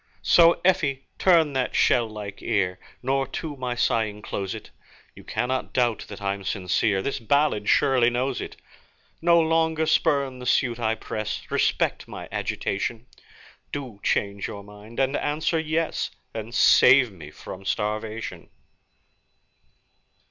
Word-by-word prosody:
So, 170 Hz, 0 st, +6 dB
Effie, 145 Hz, -8 st, +2 dB
turn 165 Hz, -6 st, +4 dB
that 130 Hz, -1 st, -1 dB
shell 120 Hz, -3 st, +3 dB
like 105 Hz, -2 st, -8 dB
ear, 90 Hz, -3 st, 0 dB, 0.2 s
Nor 135 Hz, +1 st, 0 dB
to 145 Hz, +2 st, -5 dB
my 125 Hz, -2 st, -3 dB
sighing 110 Hz, -3 st, 0 dB
close 95 Hz, -1 st, -4 dB
it, -, -, -10 dB, 0.4 s
You -, -, -14 dB
cannot 130 Hz, +1 st, -2 dB
doubt 120 Hz, -3 st, +1 dB
that -, -, -9 dB
I'm 100 Hz, 0 st, -2 dB
sincere 95 Hz, +1 st, 0 dB
This 140 Hz, -, -2 dB
ballad 115 Hz, -3 st, +1 dB
surely 125 Hz, -3 st, +4 dB
shows 125 Hz, +2 st, -1 dB
it. -, -, -7 dB, 0.7 s
No 170 Hz, 0 st, +5 dB
longer 160 Hz, 0 st, +2 dB
spurn 140 Hz, -4 st, +1 dB
the 125 Hz, -, -6 dB
suit 120 Hz, -2 st, +2 dB
I 110 Hz, -1 st, 0 dB
press, 110 Hz, -1 st, -4 dB
Respect -, -, 0 dB
my -, -, -8 dB
agitation, 110 Hz, +4 st, -3 dB, 0.7 s
Do 130 Hz, -8 st, -6 dB
change 100 Hz, -1 st, -1 dB
your 100 Hz, -, -8 dB
mind, 105 Hz, +3 st, -11 dB
and 135 Hz, +1 st, +1 dB
answer, 155 Hz, +2 st, 0 dB
'Yes', 160 Hz, +1 st, -1 dB, 0.2 s
And 115 Hz, +1 st, -6 dB
save 125 Hz, -2 st, +6 dB
me 85 Hz, -6 st, -11 dB
from 95 Hz, +5 st, -10 dB
starvation. 105 Hz, -2 st, -3 dB
120 Hz, 135 wpm, -25 LUFS, 105-140 Hz, 0.7 s, So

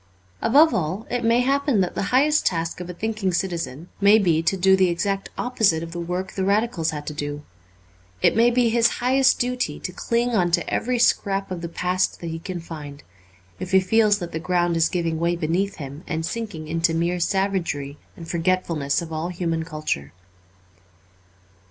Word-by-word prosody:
Above 300 Hz, +7 st, +5 dB
all, 185 Hz, +6 st, -2 dB
it 245 Hz, -1 st, -1 dB
may 230 Hz, +2 st, +3 dB
happen 275 Hz, -2 st, +1 dB
that 180 Hz, -2 st, 0 dB
the -, -, -2 dB
highest 295 Hz, +4 st, +3 dB
task 165 Hz, -1 st, -1 dB
of 180 Hz, 0 st, -7 dB
a -, -, -5 dB
thinking 215 Hz, -2 st, -2 dB
citizen 170 Hz, -4 st, -3 dB
may 200 Hz, +2 st, +7 dB
be 170 Hz, -6 st, +2 dB
to 190 Hz, +4 st, 0 dB
do 190 Hz, +1 st, +5 dB
the 190 Hz, -1 st, +3 dB
exact 195 Hz, +3 st, -2 dB
opposite 210 Hz, -10 st, +1 dB
of 165 Hz, -, -7 dB
the 175 Hz, -, -5 dB
work 180 Hz, +2 st, -3 dB
the 190 Hz, -, -3 dB
Radicals 200 Hz, -4 st, +1 dB
had 150 Hz, -1 st, -5 dB
to 150 Hz, -, -5 dB
do. 145 Hz, 0 st, -5 dB, 0.8 s
It -, -, +3 dB
may 230 Hz, +2 st, +5 dB
be 240 Hz, -1 st, +2 dB
his 230 Hz, 0 st, +4 dB
highest 260 Hz, +1 st, +3 dB
duty 250 Hz, 0 st, -2 dB
to 180 Hz, -, -4 dB
cling 235 Hz, +6 st, -1 dB
on 185 Hz, -6 st, +2 dB
to -, -, +1 dB
every 250 Hz, +1 st, -1 dB
scrap 195 Hz, -5 st, +1 dB
of 180 Hz, -2 st, -4 dB
the 170 Hz, -, -5 dB
past 180 Hz, +2 st, -1 dB
that 170 Hz, -1 st, -5 dB
he 165 Hz, -, -5 dB
can 180 Hz, +1 st, -5 dB
find, 150 Hz, -3 st, -9 dB, 0.6 s
if 185 Hz, 0 st, -6 dB
he 190 Hz, -, +7 dB
feels 210 Hz, +2 st, +3 dB
that 175 Hz, -4 st, -6 dB
the 160 Hz, -, -3 dB
ground 175 Hz, 0 st, 0 dB
is 165 Hz, 0 st, +3 dB
giving 165 Hz, -3 st, -1 dB
way 170 Hz, +1 st, +1 dB
beneath 175 Hz, +4 st, -1 dB
him 140 Hz, +2 st, -8 dB
and 160 Hz, -2 st, -2 dB
sinking 175 Hz, -5 st, -5 dB
into 165 Hz, +1 st, 0 dB
mere 170 Hz, +2 st, 0 dB
savagery 170 Hz, -7 st, -1 dB, 0.2 s
and 165 Hz, -, -9 dB
forgetfulness 170 Hz, -4 st, 0 dB
of 165 Hz, -1 st, -8 dB
all 160 Hz, +2 st, -2 dB
human 165 Hz, -2 st, -2 dB
culture. 155 Hz, -, -4 dB
180 Hz, 190 wpm, -23 LUFS, 165-215 Hz, 0.8 s, may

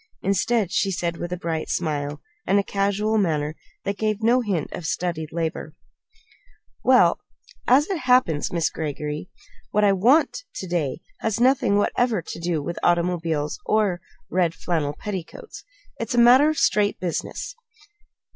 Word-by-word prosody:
Instead, 200 Hz, +1 st, +1 dB
she 195 Hz, -, +1 dB
said 170 Hz, -2 st, -2 dB
with 175 Hz, -, -5 dB
a 180 Hz, -, -2 dB
bright 165 Hz, -2 st, -3 dB
smile, 145 Hz, -3 st, -2 dB, 0.3 s
and 195 Hz, -, +3 dB
a 200 Hz, -, +3 dB
casual 205 Hz, +2 st, 0 dB
manner 155 Hz, -5 st, 0 dB, 0.3 s
that 200 Hz, 0 st, -3 dB
gave 215 Hz, 0 st, -1 dB
no 240 Hz, +3 st, +4 dB
hint 195 Hz, -9 st, -2 dB
of 180 Hz, -, -6 dB
studied 160 Hz, 0 st, -2 dB
labor: 160 Hz, -1 st, -3 dB, 1.1 s
"Well, -, -, +5 dB, 0.5 s
as 275 Hz, +5 st, +5 dB
it 385 Hz, -4 st, -2 dB
happens, 250 Hz, -, +2 dB
Miss 170 Hz, -2 st, 0 dB
Greggory, 150 Hz, +1 st, -4 dB, 0.4 s
what 210 Hz, -, +1 dB
I 200 Hz, -1 st, +5 dB
want 250 Hz, -, +3 dB, 0.2 s
to 190 Hz, -, -5 dB
day 165 Hz, -4 st, -2 dB, 0.2 s
has 225 Hz, 0 st, -1 dB
nothing 245 Hz, -5 st, +3 dB
whatever 220 Hz, -2 st, +1 dB
to -, -, -7 dB
do 170 Hz, -3 st, -1 dB
with 170 Hz, +3 st, -4 dB
automobiles 170 Hz, -, 0 dB
or 205 Hz, -5 st, +1 dB, 0.3 s
red 175 Hz, -2 st, +1 dB
flannel 155 Hz, -5 st, -1 dB
petticoats. 190 Hz, -5 st, -7 dB, 0.4 s
It's 230 Hz, +1 st, -2 dB
a -, -, -1 dB
matter 250 Hz, +5 st, +7 dB
of 310 Hz, -, -2 dB
straight 205 Hz, -1 st, +2 dB
business." 180 Hz, -, -4 dB
180 Hz, 150 wpm, -23 LUFS, 165-215 Hz, 1.1 s, matter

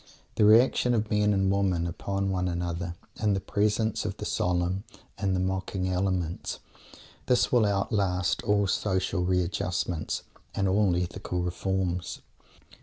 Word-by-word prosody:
The 105 Hz, -, +3 dB
reaction 120 Hz, +2 st, +5 dB
of 110 Hz, -1 st, -1 dB
men 105 Hz, 0 st, +3 dB
and 95 Hz, -1 st, +2 dB
women 95 Hz, -4 st, +1 dB
upon 95 Hz, +3 st, -2 dB
one 90 Hz, -1 st, 0 dB
another, 85 Hz, 0 st, -3 dB, 0.3 s
in 105 Hz, -2 st, +2 dB
the -, -, 0 dB
presence 105 Hz, +2 st, 0 dB
of -, -, -4 dB
the -, -, -5 dB
solemn 90 Hz, +2 st, 0 dB, 0.3 s
and 100 Hz, -2 st, 0 dB
the -, -, 0 dB
mocking 95 Hz, 0 st, -1 dB
elements; 90 Hz, -2 st, -1 dB, 0.7 s
this 125 Hz, -1 st, +3 dB
will 120 Hz, -4 st, +4 dB
outlast 95 Hz, -2 st, 0 dB
all 100 Hz, -1 st, +2 dB
social 95 Hz, -1 st, 0 dB
readjustments 90 Hz, -2 st, -1 dB, 0.3 s
and 100 Hz, -, +1 dB
all 95 Hz, -1 st, +3 dB
ethical 90 Hz, 0 st, -2 dB
reforms. 90 Hz, 0 st, -2 dB
95 Hz, 135 wpm, -28 LUFS, 90-100 Hz, 0.7 s, reaction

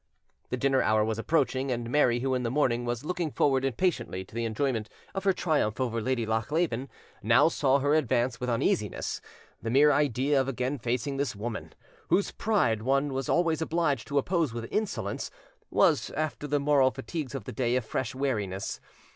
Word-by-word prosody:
The 125 Hz, -, -2 dB
dinner 135 Hz, +1 st, +2 dB
hour 110 Hz, +1 st, +3 dB
was 110 Hz, 0 st, -2 dB
approaching, 135 Hz, -1 st, +1 dB
and 120 Hz, -2 st, -2 dB
Mary, 120 Hz, -2 st, +3 dB
who 135 Hz, 0 st, 0 dB
in 125 Hz, -, 0 dB
the 120 Hz, -, -1 dB
morning 120 Hz, -3 st, +1 dB
was 120 Hz, +3 st, -3 dB
looking 175 Hz, -1 st, -1 dB
forward 135 Hz, -2 st, +2 dB
impatiently 135 Hz, -, -1 dB
to -, -, -21 dB
the 115 Hz, 0 st, -2 dB
enjoyment 115 Hz, -1 st, -1 dB, 0.2 s
of 195 Hz, -1 st, -4 dB
her 195 Hz, -, +5 dB
triumph 150 Hz, -, 0 dB
over 115 Hz, -3 st, -1 dB
Lady 125 Hz, 0 st, 0 dB
Lochleven, 125 Hz, +4 st, -1 dB, 0.3 s
now 115 Hz, +9 st, +5 dB
saw 140 Hz, -4 st, +2 dB
her 145 Hz, +1 st, +1 dB
advance 125 Hz, -4 st, +1 dB
with 125 Hz, -1 st, -2 dB
uneasiness: 115 Hz, -1 st, -1 dB, 0.4 s
the 115 Hz, -, -3 dB
mere 145 Hz, +5 st, +5 dB
idea 140 Hz, 0 st, +2 dB
of 130 Hz, -, -3 dB
again 130 Hz, +1 st, -2 dB
facing 125 Hz, +4 st, -2 dB
this 140 Hz, -5 st, -1 dB
woman, 110 Hz, +2 st, -5 dB, 0.3 s
whose 200 Hz, -, +2 dB
pride 125 Hz, -, +1 dB
one 135 Hz, +3 st, +1 dB
was 135 Hz, 0 st, -3 dB
always 165 Hz, -2 st, +2 dB
obliged 160 Hz, -7 st, 0 dB
to 145 Hz, -, -1 dB
oppose 160 Hz, -4 st, +1 dB
with 115 Hz, -1 st, -4 dB
insolence, 215 Hz, -1 st, -2 dB, 0.4 s
was, -, -, +3 dB
after 155 Hz, -1 st, -2 dB
the 145 Hz, 0 st, +1 dB
moral 140 Hz, -2 st, +4 dB
fatigues 140 Hz, +1 st, -5 dB
of 135 Hz, -, -4 dB
the -, -, -7 dB
day, 120 Hz, +2 st, 0 dB
a 130 Hz, -, +2 dB
fresh 120 Hz, +2 st, -3 dB
weariness. 105 Hz, -8 st, -2 dB
130 Hz, 185 wpm, -28 LUFS, 115-145 Hz, 0.4 s, her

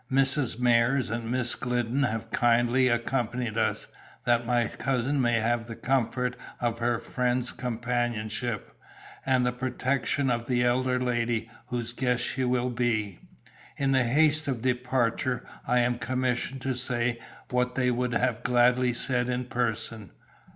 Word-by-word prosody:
Mrs. 135 Hz, -2 st, +3 dB
Myers 120 Hz, 0 st, +3 dB
and 115 Hz, 0 st, -3 dB
Miss 125 Hz, -1 st, +2 dB
Glidden 125 Hz, +1 st, -1 dB
have 115 Hz, -5 st, -2 dB
kindly 120 Hz, +2 st, +3 dB
accompanied 120 Hz, -1 st, -1 dB
us, -, -, 0 dB, 0.4 s
that 120 Hz, -1 st, +2 dB
my 120 Hz, -1 st, +2 dB
cousin 135 Hz, +4 st, -1 dB
may 120 Hz, -1 st, +2 dB
have 115 Hz, +1 st, 0 dB
the 115 Hz, -, -6 dB
comfort 125 Hz, 0 st, 0 dB, 0.2 s
of 115 Hz, -1 st, -1 dB
her 120 Hz, 0 st, +1 dB
friends' 125 Hz, +1 st, -1 dB
companionship, 120 Hz, -2 st, -3 dB, 0.5 s
and 130 Hz, -2 st, +3 dB
the 125 Hz, -, +2 dB
protection 130 Hz, +2 st, -1 dB
of 120 Hz, -1 st, -2 dB
the 120 Hz, -1 st, +2 dB
elder 125 Hz, +1 st, +1 dB
lady, 120 Hz, -2 st, -1 dB, 0.2 s
whose 120 Hz, -1 st, -3 dB
guest 125 Hz, -1 st, 0 dB
she 130 Hz, +2 st, -1 dB
will 125 Hz, 0 st, 0 dB
be. 110 Hz, -6 st, -1 dB, 0.6 s
In 135 Hz, -1 st, +1 dB
the 130 Hz, -1 st, +4 dB
haste 150 Hz, +4 st, +3 dB
of 125 Hz, -4 st, -2 dB
departure 125 Hz, -1 st, 0 dB, 0.2 s
I 125 Hz, 0 st, +3 dB
am 120 Hz, 0 st, 0 dB
commissioned 130 Hz, +1 st, -1 dB
to 135 Hz, -, 0 dB
say 120 Hz, -1 st, -1 dB, 0.3 s
what 125 Hz, 0 st, 0 dB
they 125 Hz, -1 st, +2 dB
would 125 Hz, 0 st, -1 dB
have 125 Hz, -2 st, 0 dB
gladly 125 Hz, 0 st, +3 dB
said 125 Hz, 0 st, +1 dB
in 125 Hz, 0 st, -1 dB
person. 115 Hz, -4 st, -3 dB
125 Hz, 145 wpm, -27 LUFS, 120-125 Hz, 0.6 s, the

